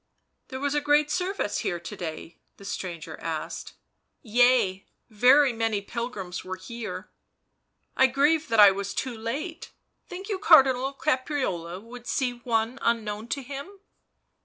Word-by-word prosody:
"There 260 - -6
was 285 +1 -1
a 295 - +1
great 295 +1 +3
service 360 - -1
here 175 - -2
to 170 - -8
day?" 165 0 -7 0.2
the 200 - -13
stranger 175 -5 -6
asked. - - -5 0.3
" - - -51 0.2
Yea, 230 -7 +4 0.2
very 255 +5 +5
many 225 -2 0
pilgrims 200 -4 -5
were 185 0 -5
here." 210 0 -7 0.4
" - - -49
I 260 - +6
grieve 295 +5 +2
that 225 -1 +1
I 205 -1 +10
was 200 0 -4
too 260 -2 -3
late 275 +10 -5 0.2
— - - -49
think 370 +2 -7
you 405 -4 -2
Cardinal 270 -7 +5
Caprarola 255 - -2
would 240 +1 -11
see 255 -1 0
one 235 +1 -1
unknown 220 -2 -1
to 275 +2 -3
him?" 280 +8 -7
245 Hz, 155 wpm, -26 LUFS, 205-280 Hz, 0.4 s, I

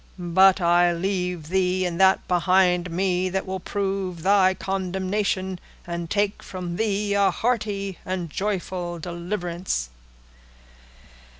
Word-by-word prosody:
"But 190 +2 +4
I 175 0 +4
leave 180 -3 -2
thee, 185 0 +1
and 175 0 -2
that 190 0 +4
behind 180 0 +3
me 185 +1 0
that 190 +1 -2
will 190 0 -4
prove 190 -3 -3
thy 190 -1 +4
condemnation, 190 0 -2 0.3
and 170 -1 -5
take 205 0 0
from 180 -2 -6
thee 205 -2 0
a 200 -1 +4
hearty 205 -5 -2
and 185 -2 -3
joyful 185 -3 -3
deliverance." 170 - -3
185 Hz, 115 wpm, -24 LUFS, 175-195 Hz, 0.3 s, But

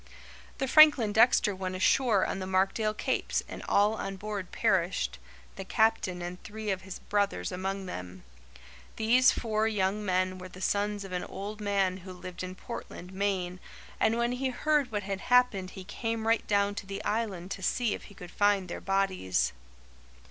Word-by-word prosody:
The 270 - -1
Franklin 285 -8 +7
Dexter 220 -3 +4
went 185 0 -4
ashore 210 +1 +3
on - - -3
the 185 - -4
Markdale 195 +3 +1
Capes - - -1
and - - -8
all 205 +2 +4
on 195 -3 -4
board 200 -2 -5
perished, 185 -1 0 0.4
the 195 - -4
Captain 190 -4 +1
and 175 +1 -6
three 215 -1 -4
of 190 -1 -2
his 190 -1 -8
brothers 200 - -1
among 190 +1 -3
them. 90 - -7 0.7
These 245 +4 +5
four 220 -1 0
young 205 -1 0
men 185 -1 0
were 185 0 -8
the 185 - -12
sons 205 +1 0
of 195 - -9
an 180 -1 -2
old 210 +2 -7
man 195 -2 +1
who 185 0 -10
lived 180 -1 -8
in 185 0 -5
Portland, 185 -4 -8
Maine, 190 -2 -1 0.4
and 225 +1 +3
when 235 0 +1
he 260 +1 -1
heard 290 0 +1
what 205 -2 -2
had 195 0 -3
happened 245 -7 +3
he 190 - -6
came 225 +3 -3
right 230 0 +2
down 200 0 +2
to 195 - -18
the 195 0 -5
Island 205 -4 -2
to 195 - -4
see 230 +4 +1
if - - -7
he 200 - -14
could 180 -3 -10
find 205 -3 +2
their - - -5
bodies. 195 - 0
200 Hz, 180 wpm, -29 LUFS, 185-220 Hz, 0.7 s, Franklin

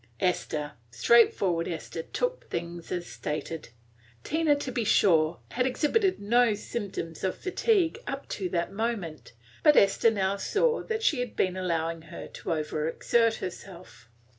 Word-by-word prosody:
Esther, 155 -5 -1 0.2
straightforward 175 - +3
Esther, 165 -1 -5
took - - -3
things 170 0 -5
as 175 -1 -2
stated. 155 -1 -5 0.5
Tina, 315 -1 +2
to 285 -2 -4
be 240 -2 -1
sure, 170 -6 +3
had 250 +1 +1
exhibited 370 - +1
no 230 +2 +3
symptoms 200 -7 -5
of 190 - -1
fatigue 385 0 +1
up - - -4
to 445 -7 -3
that 170 - -1
moment; 200 - -3 0.3
but 300 - +6
Esther 200 +3 +5
now 200 -2 0
saw 460 - +1
that 450 -1 -3
she 300 - +3
had 245 -2 -3
been 185 -1 +1
allowing 165 -3 -1
her 160 - -9
to - - -6
over 155 -1 -1
exert 230 +5 +2
herself. 180 - -9
195 Hz, 145 wpm, -28 LUFS, 165-255 Hz, 0.5 s, but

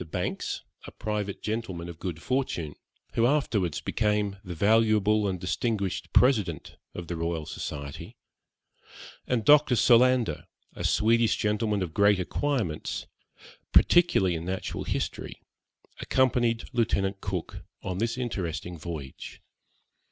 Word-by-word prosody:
Banks, - - -3 0.2
a - - -8
private 105 -2 -4
gentleman 100 -6 -3
of 85 -1 -9
good 85 -3 -5
fortune, 125 - -1 0.4
who 115 +1 +3
afterwards 110 - 0
became 105 -2 0
the 90 -3 -6
valuable 105 +1 +3
and 95 -2 -2
distinguished 100 +2 -2
President 105 - +2 0.2
of 85 - -5
the 85 - -3
Royal 85 -1 -2
Society, 70 -2 -7 1.1
and 115 -4 0
Dr. 145 -4 +6
Solander, 120 -7 +4 0.3
a - - -7
Swedish 115 +1 +3
gentleman 105 -1 0
of 85 -3 -6
great 100 +1 +4
acquirements, 110 - -2 0.7
particularly 175 - +5
in 80 -1 -4
natural 95 +1 -4
history, - - -3 0.6
accompanied 120 -3 +2
Lieutenant 100 -4 0
Cook 95 -4 -4 0.2
on 95 -1 -3
this 115 +2 -1
interesting 90 -8 -4
voyage. 75 -4 -7
100 Hz, 115 wpm, -27 LUFS, 85-115 Hz, 1.1 s, Dr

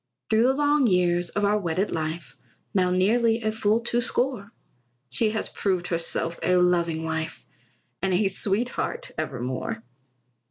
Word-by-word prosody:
Through 220 0 +4
the 265 - +2
long 290 -2 +3
years 175 -2 +2
of 205 0 0
our 210 +1 +2
wedded 185 +2 -1
life, 160 +1 -4 0.4
Now 185 -2 +2
nearly 225 +5 +2
a 215 - +1
full 220 +1 +1
two 235 +1 0
score, 240 -3 -1 0.6
She 220 - +3
has 220 0 -1
proved 185 -3 -2
herself 165 0 -2
a 180 - +2
loving 170 -2 +2
wife, 160 0 -4 0.6
And 190 - 0
a 190 +3 +2
sweetheart 235 - -1
evermore. 125 -3 -4
190 Hz, 145 wpm, -25 LUFS, 170-225 Hz, 0.6 s, Through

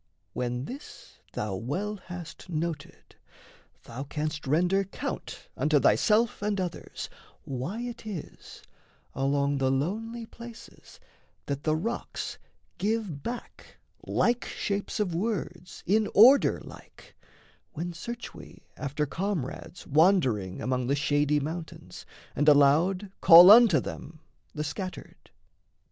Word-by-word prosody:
When 125 +1 -3
this 270 - -11
Thou 105 -2 -3
well 185 - -3
hast 180 -1 -10
noted, 160 -3 -5 0.7
thou 120 +4 -7
canst 150 +1 -4
render 180 +7 +2
count 195 - -6
Unto - - +2
thyself 220 0 +3
and 205 -1 -1
others 180 -2 -5 0.4
why 140 - -4
it 240 -1 -6
is 195 -7 -8 0.5
Along 140 +1 0
the 130 -1 +2
lonely 220 - -2
places 235 0 -13 0.5
that 140 -1 -3
the 155 0 +1
rocks 230 +9 -4 0.4
Give 210 -8 -1
back 240 - -8 0.3
like 240 +1 +1
shapes 200 +1 -3
of 195 -5 0
words 180 -2 -4
in 210 +3 +2
order 255 +7 +7
like, - - -15 0.6
When 175 +1 -4
search 235 +7 -7
we - - -13
after 145 +1 -2
comrades 175 0 -4
wandering 140 - +2
Among 125 +1 -1
the 140 - +2
shady 145 0 +1
mountains, 160 +3 -7 0.3
and 150 +3 +4
aloud 165 +8 +4
Call 175 +3 +10
unto 220 -7 +8
them, 155 - -8 0.4
the 150 - -2
scattered. 185 +5 -7
170 Hz, 115 wpm, -28 LUFS, 145-205 Hz, 0.7 s, Call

